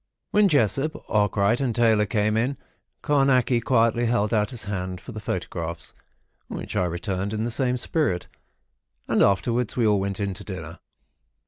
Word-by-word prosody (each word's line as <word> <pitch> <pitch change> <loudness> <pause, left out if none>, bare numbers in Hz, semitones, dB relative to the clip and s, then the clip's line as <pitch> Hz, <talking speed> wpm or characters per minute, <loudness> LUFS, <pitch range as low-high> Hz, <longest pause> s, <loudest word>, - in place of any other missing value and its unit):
When 210 0 +5
Jessop, 140 - +1
Arkwright, 105 +3 +2
and 125 -5 0
Taylor 110 -3 +3
came 105 -1 +1
in, 125 +5 0 0.5
Carnacki 135 -4 +3
quietly 115 -1 +2
held 115 -2 +1
out 105 -1 +2
his 125 -4 -5
hand 95 -2 -4
for 125 - -10
the 110 - -6
photographs, 85 -4 -4 0.5
which - - -6
I 90 - +2
returned 95 +3 -3
in 110 0 -1
the 120 - -2
same 125 +1 0
spirit, 125 - -1 0.8
and - - +2
afterwards 115 +5 +1
we 120 - +3
all 105 -2 +3
went 100 0 -3
in 100 -1 -1
to 100 +2 -9
dinner. 80 -5 -7
110 Hz, 160 wpm, -24 LUFS, 100-125 Hz, 0.8 s, When